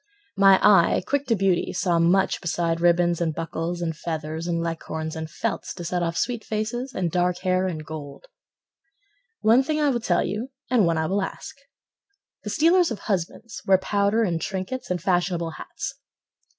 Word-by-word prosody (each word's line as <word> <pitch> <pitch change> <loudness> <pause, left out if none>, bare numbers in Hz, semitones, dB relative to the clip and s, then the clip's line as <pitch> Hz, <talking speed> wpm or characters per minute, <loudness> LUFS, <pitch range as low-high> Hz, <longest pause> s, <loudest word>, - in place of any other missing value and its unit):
My 195 -1 +6
eye 195 -4 +5
quick 285 0 -1
to 230 - +3
beauty 195 -3 +1
Saw 175 -2 +1
much 180 +3 +2
beside 170 -1 -1
ribbons 175 0 +3
And 160 -3 0
buckles 165 +1 -3
and 165 -1 -2
feathers 160 0 -4
And 170 -1 0
leghorns 160 -1 -4
and 160 0 -5
felts, - - -3
To 175 -2 -7
set 175 +1 -1
off 170 0 -1
sweet 240 -2 -1
faces, 230 +5 -3
And 175 -3 -1
dark 180 +1 +1
hair 185 0 +1
and 155 -4 -5
gold. 150 - -8 1.2
One 230 +4 +5
thing 305 +3 -1
I 295 -1 +3
will 245 -3 0
tell 175 -6 +1
you 215 +7 -3 0.2
And 225 -8 +4
one 165 -1 +1
I 160 - 0
will 195 +5 0
ask: 190 - -6 0.9
The 210 - -5
stealers 340 - +4
of 220 -4 -5
husbands 200 +3 -3
Wear 190 -1 +6
powder 200 +3 +1
and 170 -5 -1
trinkets, 195 +8 -4
And 180 -1 -1
fashionable 175 -1 0
hats. - - -6
180 Hz, 175 wpm, -24 LUFS, 170-210 Hz, 1.2 s, My